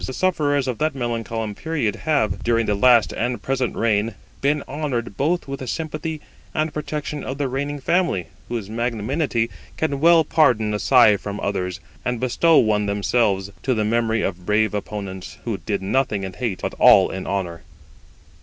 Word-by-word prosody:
The 130 Hz, -, -4 dB
sufferers 145 Hz, -6 st, +1 dB
of 125 Hz, -3 st, -3 dB
that 155 Hz, -1 st, 0 dB
melancholy 115 Hz, -3 st, -3 dB
period 145 Hz, -4 st, -2 dB
have, 140 Hz, -, +1 dB
during 115 Hz, -1 st, +1 dB
the 105 Hz, -, +1 dB
last 120 Hz, +2 st, +4 dB
and 120 Hz, 0 st, -2 dB
present 130 Hz, +1 st, -1 dB
reign, 110 Hz, -1 st, +1 dB, 0.3 s
been 145 Hz, +1 st, +1 dB
honoured 130 Hz, -7 st, -3 dB
both 165 Hz, -, 0 dB
with 135 Hz, 0 st, -5 dB
the 130 Hz, -, -6 dB
sympathy 155 Hz, +1 st, -4 dB, 0.3 s
and 155 Hz, 0 st, 0 dB
protection 150 Hz, -1 st, -4 dB
of 135 Hz, -, -4 dB
the 145 Hz, -2 st, 0 dB
reigning 145 Hz, +3 st, -3 dB
family, 170 Hz, -, +1 dB, 0.2 s
whose 115 Hz, -4 st, -3 dB
magnanimity 115 Hz, +2 st, -1 dB, 0.3 s
can 145 Hz, -3 st, -1 dB
well 165 Hz, +1 st, +6 dB
pardon 125 Hz, -9 st, +3 dB
a 105 Hz, -, -1 dB
sigh 120 Hz, -5 st, +6 dB
from 100 Hz, +1 st, -6 dB
others, 90 Hz, -2 st, -2 dB, 0.2 s
and 125 Hz, -1 st, -1 dB
bestow 155 Hz, +7 st, +3 dB
one 105 Hz, -2 st, +3 dB
themselves, 100 Hz, -1 st, +1 dB
to 130 Hz, -1 st, 0 dB
the 110 Hz, -1 st, 0 dB
memory 115 Hz, 0 st, +1 dB
of 90 Hz, -2 st, -3 dB
brave 105 Hz, +1 st, +2 dB
opponents, 100 Hz, -2 st, -5 dB
who 110 Hz, -5 st, -2 dB
did 100 Hz, +3 st, -3 dB
nothing 105 Hz, -1 st, 0 dB
in 95 Hz, -1 st, -5 dB
hate, 110 Hz, -2 st, -3 dB
but -, -, -2 dB
all -, -, +7 dB
in 95 Hz, 0 st, -5 dB
honour. 90 Hz, -4 st, -3 dB
120 Hz, 175 wpm, -22 LUFS, 105-145 Hz, 0.3 s, all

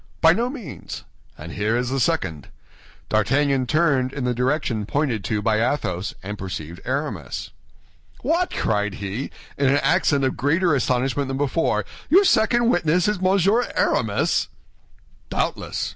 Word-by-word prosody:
"By 165 Hz, 0 st, +6 dB
no 235 Hz, +6 st, 0 dB
means." 255 Hz, -6 st, -8 dB, 0.3 s
"And 80 Hz, +2 st, -8 dB
here 105 Hz, +5 st, 0 dB
is 125 Hz, 0 st, -1 dB
the 135 Hz, -, 0 dB
second." 80 Hz, -, -1 dB, 0.6 s
D'Artagnan 135 Hz, +5 st, +2 dB
turned 140 Hz, -4 st, +2 dB
in 140 Hz, -1 st, -4 dB
the 125 Hz, 0 st, +1 dB
direction 125 Hz, -4 st, -1 dB
pointed 130 Hz, -8 st, 0 dB
to 105 Hz, -2 st, -1 dB
by 110 Hz, 0 st, +2 dB
Athos, 100 Hz, -7 st, -1 dB
and 105 Hz, +2 st, -6 dB
perceived 85 Hz, -2 st, -6 dB
Aramis. 130 Hz, -, -3 dB, 0.7 s
"What!" 335 Hz, +7 st, +1 dB
cried 105 Hz, -2 st, 0 dB
he, 100 Hz, +7 st, -4 dB, 0.3 s
in 140 Hz, -, +3 dB
an 140 Hz, -, +4 dB
accent 140 Hz, -2 st, +2 dB
of 130 Hz, -, +1 dB
greater 165 Hz, +5 st, +2 dB
astonishment 130 Hz, +1 st, 0 dB
than 135 Hz, 0 st, -3 dB
before, 145 Hz, +4 st, 0 dB, 0.2 s
"your 380 Hz, +5 st, +6 dB
second 235 Hz, -, +3 dB
witness 175 Hz, +1 st, +2 dB
is 210 Hz, -3 st, 0 dB
Monsieur 195 Hz, +5 st, +2 dB
Aramis?" -, -, +1 dB, 0.8 s
"Doubtless! -, -, -2 dB
135 Hz, 145 wpm, -23 LUFS, 110-165 Hz, 0.8 s, By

